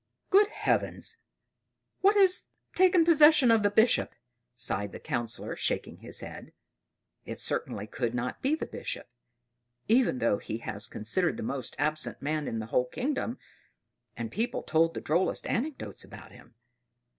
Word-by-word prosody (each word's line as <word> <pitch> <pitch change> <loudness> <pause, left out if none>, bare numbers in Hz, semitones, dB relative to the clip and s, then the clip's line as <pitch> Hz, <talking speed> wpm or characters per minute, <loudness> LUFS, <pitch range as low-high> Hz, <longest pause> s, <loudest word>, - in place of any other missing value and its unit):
"Good 405 +1 +6
Heavens! 455 +1 -2 0.8
What 400 +2 +4
has 380 -2 +4 0.3
taken 360 -2 +5
possession 300 -5 +6
of 225 -1 +4
the 205 - +3
Bishop?" 220 +3 +3 0.4
sighed 100 -4 -1
the - - -7
Councillor, 120 -2 -3
shaking - - -2
his - - -6
head. - - -9 0.7
It - - -7
certainly 105 - -2
could 120 +2 -3
not 125 0 -3
be 280 +4 +2
the - - -4
Bishop; - - -6 0.8
even 230 - +3
though 115 -4 +1
he 115 +1 -6
was 105 0 -2
considered 165 - +1
the - - -5
most 130 +1 -3
absent 155 +2 -1
man 150 +1 -2
in 115 - -3
the 110 - -4
whole 125 - +3
kingdom, 255 - -2 0.8
and 230 - -4
people 235 +3 -2
told 165 +1 +2
the - - -4
drollest 170 +5 0
anecdotes 275 +5 -3
about - - -12
him. 115 - -17
180 Hz, 150 wpm, -29 LUFS, -, 0.8 s, Good